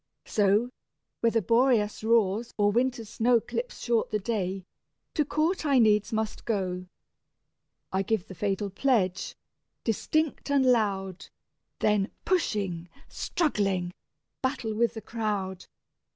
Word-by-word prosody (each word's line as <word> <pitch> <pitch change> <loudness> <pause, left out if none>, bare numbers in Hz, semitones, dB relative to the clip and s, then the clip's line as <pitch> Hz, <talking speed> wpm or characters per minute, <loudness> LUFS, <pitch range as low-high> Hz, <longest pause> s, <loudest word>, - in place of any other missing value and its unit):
So, 210 +4 +2 0.5
whether 230 -1 +2
Boreas 230 -1 +2
roars, 225 0 +2
or 205 -1 +3
winter's 240 0 0
snow 235 +3 +3
Clips - - -5
short 235 -2 +1
the 215 - 0
day, 195 -3 -2 0.5
to 305 - +2
court 315 +6 0
I 280 -3 +3
needs 215 -3 +4
must 220 -1 -2
go. 185 -4 -2 1.0
I 190 - +1
give 205 -1 -1
the - - -8
fatal 195 +2 -2
pledge, 195 -5 +1 0.5
distinct 305 +8 0
and 280 -2 +3
loud, 195 -6 +1 0.5
Then 210 -1 +2 0.2
pushing, 195 - 0 0.2
struggling, 195 - -1 0.5
battle 250 -4 -1
with 235 +2 +1
the 220 - -5
crowd. 205 -4 -3
215 Hz, 120 wpm, -28 LUFS, 195-240 Hz, 1.0 s, needs